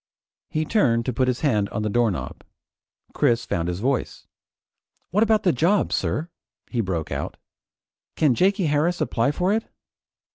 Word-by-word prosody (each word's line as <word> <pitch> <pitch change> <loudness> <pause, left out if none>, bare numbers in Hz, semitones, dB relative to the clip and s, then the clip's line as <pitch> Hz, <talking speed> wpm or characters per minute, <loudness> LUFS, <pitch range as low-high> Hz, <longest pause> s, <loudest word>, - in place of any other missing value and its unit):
He 155 0 -1
turned 120 - +2
to 125 - -1
put 130 +3 +1
his 125 -1 -1
hand 105 -9 +1
on 105 - -3
the - - 0
doorknob. 115 -4 -1 0.7
Chris 115 0 +2
found 85 0 -2
his 90 +1 -3
voice. 130 +1 -2 0.9
"What 205 +4 +2
about 220 -1 +3
the 180 - +3
job, 175 +10 +2
sir?" 165 +4 -1 0.4
he 120 - 0
broke 90 -6 -3
out. - - -4 0.8
"Can 150 -5 +3
Jakey 190 - +2
Harris 155 +4 +1
apply 115 +4 +1
for 180 +7 +1
it?" 225 +1 -2
135 Hz, 155 wpm, -23 LUFS, 115-175 Hz, 0.9 s, about